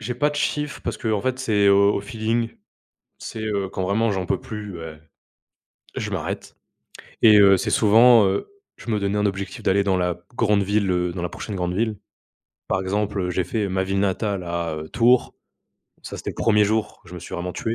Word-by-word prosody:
J'ai 125 - -4
pas 145 +5 +1
de - - -8
chiffres 150 0 -2
parce - - -3
qu'en 110 -4 -1
fait 130 +4 -2
c'est 105 -5 +2
au 100 +1 +5
au - - -1
feeling, 115 +2 -2 0.7
c'est, 110 - -7
heu, 100 -3 -2
quand 95 - -4
vraiment 105 +4 +1
j'en 95 -2 -2
peux - - -1
plus 105 -2 -7
beh, 80 -2 -8 1.0
je - - -3
m'arrête - - -5 0.7
et 110 -2 +7
heu, 100 -1 +7
c'est - - -2
souvent, 115 +1 +6
heu, 95 0 -1 0.3
je - - -9
me 105 - +1
donnais 100 +1 -1
un 105 - +1
objectif 95 -1 -3
d'aller 100 +1 +2
dans 95 -2 +1
la 90 -1 -1 0.2
grande 105 -4 +2
ville, 100 0 0
heu, 90 -1 0
dans 90 - -5
la 90 - -1
prochaine 105 +4 -7
grande 90 -1 -2
ville. 110 0 -1 0.7
Par - - 0
exemple, 100 +2 -2
heu, 90 - -2
j'ai 90 +1 0
fait 105 +2 -2
ma 95 0 0
ville 95 +1 -1
natale 100 0 -1
à, 85 -2 -3
heu, 80 0 -7
Tours. 120 +1 +3 0.7
Ça, - - -7
c'était - - -5
le - - -10
premier 105 -2 +4
jour, 110 +1 -1
je 90 0 -12
me - - -6
suis 85 - -9
vraiment 90 +1 -4
tué, 115 +5 -3
100 Hz, 215 wpm, -23 LUFS, 95-110 Hz, 1.0 s, et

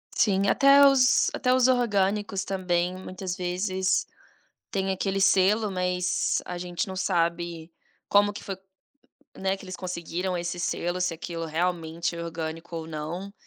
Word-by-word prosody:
Sim, 195 -2 +2
até 280 +1 +7
os 265 -2 +5
até 250 -1 +1
os 255 -1 +4
orgânicos, 205 -5 +1
também, 180 -2 -1
muitas 185 0 -6
vezes 185 +1 0 0.7
tem 195 -1 -1
aquele 195 +1 -1
selo, 200 +3 +3
mas 180 -1 0
a 180 - -5
gente 175 +4 -3
não 190 - -6
sabe 170 -2 -1 0.4
como 205 0 +4
que 205 - -9
foi, 195 - -5 0.8
né, 190 0 -1
que 195 - -12
eles 185 0 -6
conseguiram 180 0 -3
esse 175 +1 -4
selo, 175 0 -2
se 180 -2 0
aquilo 165 0 -5
realmente 170 0 -2
é 170 - -5
orgânico 165 0 -6
ou 160 -1 -5
não. 165 +6 -5
185 Hz, 145 wpm, -26 LUFS, 170-195 Hz, 0.8 s, até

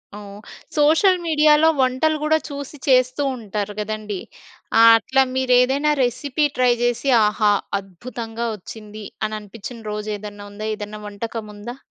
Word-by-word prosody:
ఓహ్! 205 -1 -10 0.4
Social 320 +6 +4
మీడియాలో 305 0 +5
వంటలు 260 +5 +2
కూడా 315 +1 +3
చూసి 285 +1 -7
చేస్తూ 255 +2 +3
ఉంటారు 210 -2 -4
కదండీ. 210 -2 -4 0.6
ఆ - - +8 0.2
అట్లా 265 +3 +2
మీరు 260 -1 +2
ఏదైనా 280 +4 +2
రెసిపీ 280 +4 0
ట్రై 250 -1 +4
చేసి 245 +3 0 0.2
ఆహా! 210 0 +2 0.3
అద్భుతంగా 225 +4 -7
వచ్చింది, 215 +1 -10 0.2
అని 215 0 -3
అనిపించిన 225 +3 -10
రోజు 210 0 -4
ఏదన్నా 205 0 -9
ఉందా? 215 +1 -6
ఏదన్నా 210 0 -7
వంటకం 215 +1 -6
ఉందా? 235 +5 -8
230 Hz, 135 wpm, -21 LUFS, 210-270 Hz, 0.6 s, ఆ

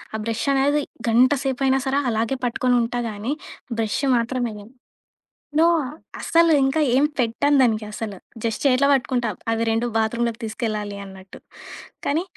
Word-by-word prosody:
ఆ - - -2
బ్రెషనేది 275 +5 +1 0.3
గంట 245 +4 +5
సేపయినా 265 0 +1
సరే, 275 +1 +2
అలాగే 230 +4 -1
పట్టుకొని 245 +1 +1
ఉంటా 240 +1 -2
గాని, 215 +6 -3 0.5
బ్రెష్ 225 +4 -1 0.2
మాత్రమేయను. 235 -2 -3 0.9
నో! 330 - +6 0.5
అసలు 335 0 +4
ఇంకా 270 +4 +1 0.2
ఏం 270 - +4 0.2
పెట్టను 270 +5 +2
దానికి 220 -3 +1
అసలు. 210 -2 -5 0.3
జస్ట్ 225 -2 -2
చేతిలో 275 +1 +4
బట్టుకుంటా. 250 -3 0 0.2
అవి 225 0 0
2 225 +2 0
బాత్రూమ్‌లోకి 230 +1 -1
తీసుకెళ్లాలి 215 -3 -3
అన్నట్టు. 190 -1 -12 0.7
కాని, 310 +4 +1
240 Hz, 130 wpm, -22 LUFS, 220-270 Hz, 0.9 s, నో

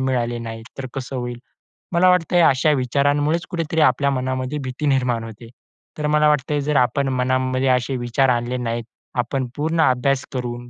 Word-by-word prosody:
मिळाले 120 -3 -1
नाहीत 115 -1 -7
तर 130 - -4
कसं 135 0 -5
होईल? 120 -1 -4 0.6
मला 180 +2 +5
वाटतंय 175 -1 +3
अशा 140 +2 +4
विचारांमुळेच 145 +4 +1
कुठेतरी 165 -2 -1
आपल्या 140 -2 +3
मनामध्ये 130 +2 -2
भीती 130 +3 -4
निर्माण 125 -4 +1
होते. 115 +1 -10 0.5
तर 150 -1 -1
मला 150 0 +3
वाटतंय 145 0 0
जर 150 +1 -1
आपण 135 +2 +2
मनामध्ये 130 +1 0
असे 125 +1 +1
विचार 120 +2 +1
आणले 120 +1 0
नाहीत. 115 -1 -3 0.4
आपण 130 +2 -1
पूर्ण 160 +2 0
अभ्यास 130 -1 +2
करून, 120 -1 -5
130 Hz, 165 wpm, -21 LUFS, 125-145 Hz, 0.6 s, मला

